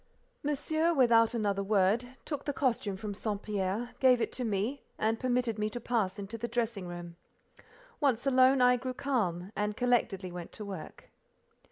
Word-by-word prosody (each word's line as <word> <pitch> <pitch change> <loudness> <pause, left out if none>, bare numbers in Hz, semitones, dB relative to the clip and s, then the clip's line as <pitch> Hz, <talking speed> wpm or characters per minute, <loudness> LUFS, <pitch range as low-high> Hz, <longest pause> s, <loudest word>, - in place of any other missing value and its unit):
Monsieur, 315 +3 0
without 235 -3 +5
another 200 -3 0
word, 215 +6 +1
took 290 -3 -4
the 285 - -1
costume 230 -8 0
from 210 +1 -5
St. 205 0 -3
Pierre, 210 +3 -2
gave 255 -2 +5
it - - -1
to 255 - -3
me, 225 +5 -1 0.2
and 225 +1 0
permitted 245 -3 0
me 210 0 0
to 240 - -5
pass 220 -6 -1
into 205 +3 -6
the 235 - -2
dressing 230 -5 -2
room. 175 -1 -8 0.8
Once 270 -5 +1
alone, 260 0 +5
I 250 0 +6
grew 255 +1 -4
calm, 200 -10 -1
and 210 0 -1
collectedly 225 -7 +1
went 175 -1 -7
to 210 - -6
work. 190 -6 -9
230 Hz, 170 wpm, -31 LUFS, 200-255 Hz, 0.8 s, I